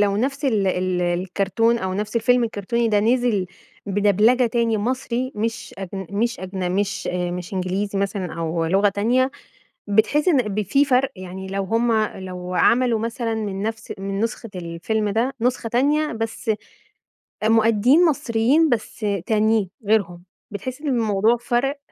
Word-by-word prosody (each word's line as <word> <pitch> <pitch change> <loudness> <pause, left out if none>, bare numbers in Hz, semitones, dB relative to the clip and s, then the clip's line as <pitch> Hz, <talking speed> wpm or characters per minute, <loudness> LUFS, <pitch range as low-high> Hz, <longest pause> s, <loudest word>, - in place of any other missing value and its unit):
لو 200 -1 +2
نفس 275 +6 -1
ال 215 -7 +2
ال 185 -1 0
الكرتون 195 +6 +1
أو 185 -3 -3
نفس 210 +3 -3
الفيلم 245 +1 +3
الكرتوني 230 +2 -1
ده 210 -2 +3
نزل 230 -3 +2 0.4
بدبلجة 210 +5 +3
تاني 230 -1 +1
مصري 250 +2 -2
مش 225 +2 -3
أجن 190 -1 -6
مش 235 +4 -1
أجن 185 -1 -3
مش 200 +1 -1
مش 180 +1 -3
إنجليزي 190 +2 -2
مثلًا 195 -2 -2
أو 165 0 -1
لغة 195 +5 +3
تانية، 240 +7 +1 0.6
بتحس 220 - +2
إن 330 -6 +5 0.2
ب 215 - +1
في 275 +9 +2
فرق؟ 265 0 +2
يعني 185 0 -8
لو 195 +1 -2
هم 230 +4 +1 0.3
لو 180 -1 -6
عملوا 235 +2 +3
مثلًا 230 0 -2
من 200 -3 -3
نفس 220 0 -4
من 195 0 -4
نسخة 230 0 -3
الفيلم 180 +5 -2
ده 235 +6 0
نسخة 245 -1 0
تانية 295 +6 +2
بس 225 0 -4 0.9
آآ 215 - +2
مؤديين 230 +8 +4
مصريين 285 +1 +2
بس 220 -2 -2 0.2
تانيين، 215 -3 +2 0.2
غيرهم، 180 -5 +1 0.3
بتحس 255 +7 -6
إن 305 - -4
الموضوع 225 -2 +2
فَرَق؟ 245 +4 -1
220 Hz, 150 wpm, -22 LUFS, 195-240 Hz, 0.9 s, إن